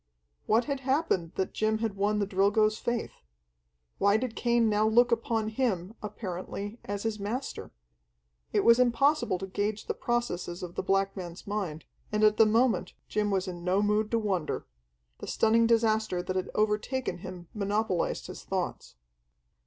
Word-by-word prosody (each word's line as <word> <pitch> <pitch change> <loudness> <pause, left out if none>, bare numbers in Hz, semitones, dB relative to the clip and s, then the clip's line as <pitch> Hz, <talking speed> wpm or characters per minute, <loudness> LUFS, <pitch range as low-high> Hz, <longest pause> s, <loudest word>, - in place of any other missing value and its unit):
What 230 +2 +3
had 280 -2 -2
happened 265 - 0
that 190 - -2
Jim 220 0 +1
had 220 -2 -2
won 205 +2 +1
the 205 - +1
Drilgo's 205 +2 +2
faith? 235 -1 -3 0.8
Why 200 +1 +4
did 235 -1 -3
Cain 235 -1 +2
now 215 0 +3
look 240 +2 +4
upon 225 -1 0
him, 215 -5 -1
apparently, 205 +1 -5
as 205 0 -4
his 220 -2 -2
master? 230 +7 -4 0.8
It - - +2
was 235 +1 +6
impossible 250 -2 +3
to 195 - -5
gauge 205 +2 -2
the - - -1
processes 190 -8 -2
of 175 -1 -6
the - - -2
black 195 +1 +1
man's 175 -2 -7
mind, 195 -7 -3 0.3
and 210 0 +1
at 215 0 +5
the 225 - +6
moment 230 +2 +2 0.2
Jim 210 -1 0
was 190 -1 0
in 175 -1 -6
no 185 +3 +2
mood 210 +1 +1
to 230 - +1
wonder. 195 -7 -1 0.5
The - - -7
stunning 230 +1 +3
disaster 220 -5 +2
that 185 +1 -3
had 185 - -1
overtaken 215 +3 0
him 180 -2 -8
monopolized 205 -3 -1
his - - -8
thoughts. - - -4
210 Hz, 165 wpm, -29 LUFS, 195-230 Hz, 0.8 s, was